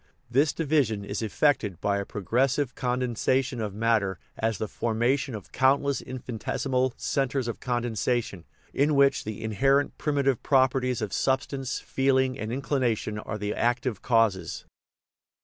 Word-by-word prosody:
This 140 +5 +3
division 135 -10 0
is 100 +2 -4
effected 110 - +1
by 100 0 0
a 100 - -3
progressive 125 +6 0
con 125 0 -1
densation 125 +1 0
of 105 -2 -4
matter 110 -4 +1 0.2
as 110 -2 -1
the 110 - -3
formation 120 +4 0
of 105 - -9
countless 140 +1 +2
in 130 0 -7
finitesimal 125 +2 -1
" - - -36 0.2
centres 135 -2 0
of 120 - -4
condensation/' 120 -5 -1 0.3
in 145 +2 +2
which 140 0 +3
the 110 0 -5
in 110 -1 -3
herent 135 +5 +3
primitive 140 -4 +1
properties 130 -3 +2
of 100 - -4
substance 135 0 -1
feeling 130 -1 +1
and 110 +1 -4
inclination 125 -5 -1
are 105 - -5
the 105 0 -2
active 120 -2 0
causes. 110 -7 +1
125 Hz, 150 wpm, -27 LUFS, 110-135 Hz, 0.3 s, This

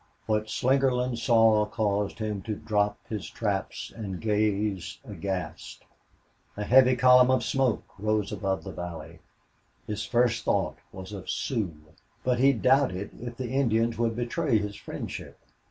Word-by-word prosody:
What 110 -1 0
Slingerland 130 -2 +1
saw 115 -3 +5
caused 105 -2 -1
him 105 -3 -3
to 110 - -1
drop 105 -1 0
his 105 -3 -5
traps 100 -4 -3
and 100 -5 -5
gaze 105 -3 0
aghast. 90 - -5 0.7
A 105 - -2
heavy 130 +3 +6
column 125 0 +6
of 130 -2 +3
smoke 130 -3 +1 0.2
rose 105 -1 0
above 95 -2 -2
the 95 - -6
valley. 85 -1 -7 0.7
His 105 0 -3
first 120 -1 +1
thought - - 0
was 95 +1 -9
of 95 -4 -8
Sioux. 105 - -2 0.5
But 125 -1 +1
he 135 +2 +6
doubted 125 -6 +2
if 120 0 -6
the 125 -2 -4
Indians 115 -3 +1
would 115 -1 +1
betray 120 +2 +1
his 105 -1 -3
friendship. - - -7
110 Hz, 140 wpm, -27 LUFS, 100-125 Hz, 0.7 s, heavy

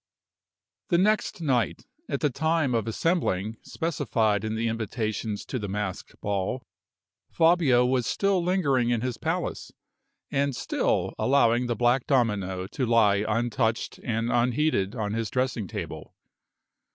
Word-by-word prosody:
The 170 - +4
next 210 -1 +1
night, 130 -7 0 0.2
at - - -2
the 150 - +2
time 160 -1 +1
of 115 -2 0
assembling 110 - 0
specified 115 - 0
in 110 0 -2
the 115 +1 0
invitations 110 -1 -3
to 130 - -3
the 105 - -4
masked 100 -1 -5
ball, 100 +5 -2 0.7
Fabio 160 -7 +4
was 125 -2 +1
still 195 -3 +1
lingering 140 -10 +2
in 120 -2 +1
his 125 -1 -2
palace, - - -3 0.6
and 140 -1 0
still - - 0
allowing 125 -3 +3
the 120 - 0
black 120 +3 +2
domino 105 - +1
to 125 +7 -2
lie 105 -3 +4
untouched 115 +1 -1
and 115 0 -1
unheeded 120 -4 +1
on 105 -3 -2
his 115 -1 -2
dressing 125 -5 -1
table. 80 -2 -7
120 Hz, 135 wpm, -26 LUFS, 110-135 Hz, 0.7 s, The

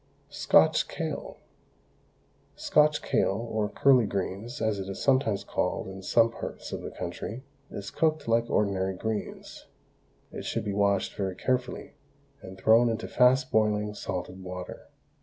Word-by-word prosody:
SCOTCH - - +4
KALE. - - -5 1.2
Scotch 150 0 +3
kale, 95 - +1
or 105 -1 0
curly 125 +1 +4
greens, 100 +6 -4
as 110 -2 0
it 95 0 -5
is 95 - -6
sometimes 130 -7 +2
called - - -2
in 95 0 -8
some 115 +4 +3
parts - - -7
of - - -4
the - - -6
country, 120 +5 -6 0.3
is 100 0 -7
cooked 155 -3 0
like 115 +1 +2
ordinary 95 -2 0
greens. 110 +2 -5 0.6
It - - -7
should - - -2
be 100 - -2
washed 100 -1 +1
very 95 -2 -2
carefully, 125 +4 -2 0.5
and 95 0 -10
thrown 115 +5 +5
into 115 - -3
fast 130 +1 +3
boiling 105 -1 +1
salted 95 -1 -5
water. 90 0 -8
105 Hz, 140 wpm, -28 LUFS, 95-120 Hz, 1.2 s, thrown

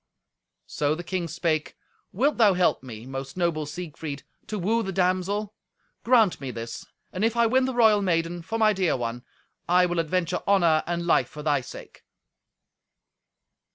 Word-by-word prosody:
So 150 +1 -1
the 175 - -7
king 175 -1 -3
spake, 160 -2 -2 0.4
"Wilt 275 +10 +1
thou 210 -5 +5
help 180 0 +2
me, 115 -3 -9
most 135 +3 -7
noble 165 -4 0
Siegfried, 150 -2 -6 0.2
to 215 - -4
woo 215 +5 +1
the 195 - -3
damsel? 190 +3 0 0.5
Grant 225 -9 +3
me 135 - -4
this, 115 -1 -7 0.3
and 185 - -2
if 225 +1 +1
I 235 - +4
win 255 +3 +3
the 260 -1 -3
royal 220 -3 +5
maiden 170 -2 0
for 225 +7 -4
my 215 -1 +4
dear 185 -7 +1
one, 120 0 -4 0.5
I 180 +1 +5
will 175 -1 -1
adventure 170 +2 -1
honour 170 -6 +4
and 170 0 -2
life 170 - +2
for 150 - -9
thy 145 -3 +1
sake." - - -12
175 Hz, 165 wpm, -25 LUFS, 155-205 Hz, 0.5 s, thou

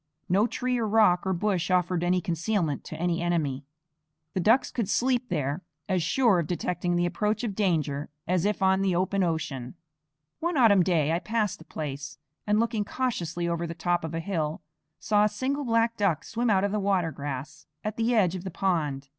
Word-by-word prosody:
No 200 +6 +3
tree 250 0 -1
or 225 - 0
rock 205 -4 +4
or - - +2
bush 185 -1 0
offered 180 -1 +1
any 180 +1 +2
concealment 170 -3 -1
to - - -7
an 175 +1 +1
enemy; 165 -6 -1 0.7
the - - -1
ducks 225 +9 +3
could 225 -5 -2
sleep 250 +1 +1
there 145 +4 -1 0.3
as 185 -2 +1
sure 205 +3 +3
of 165 - -2
detecting 175 0 -1
the 175 0 +2
approach 210 +6 -1
of 220 -4 -2
danger 155 -8 0 0.2
as 180 -1 +1
if 205 -1 0
on 190 0 +3
the 190 -2 +1
open 190 +2 +1
ocean. 160 -6 -2 0.6
One 340 -1 -1
autumn 215 -7 +6
day 165 -4 +2
I 165 - +1
passed 215 0 -1
the 160 - -14
place 140 -2 -6 0.3
and, 210 +1 +3
looking 230 -2 0
cautiously 180 -8 -2
over 170 0 -1
the 165 - -6
top 175 0 0
of 160 0 -4
a - - -1
hill, 165 -3 -2 0.3
saw 210 -1 +2
a - - +2
single 270 +7 -2
black 230 0 +2
duck 190 -7 +1
swim 235 +1 -1
out 195 -2 +3
of 200 - +1
the 210 - 0
water 190 -4 +1
grass 145 +1 -6 0.2
at 215 0 -3
the 235 +1 +1
edge 185 -6 +3
of 185 -2 -5
the 190 - -4
pond. 155 -7 -1
185 Hz, 200 wpm, -27 LUFS, 165-210 Hz, 0.7 s, autumn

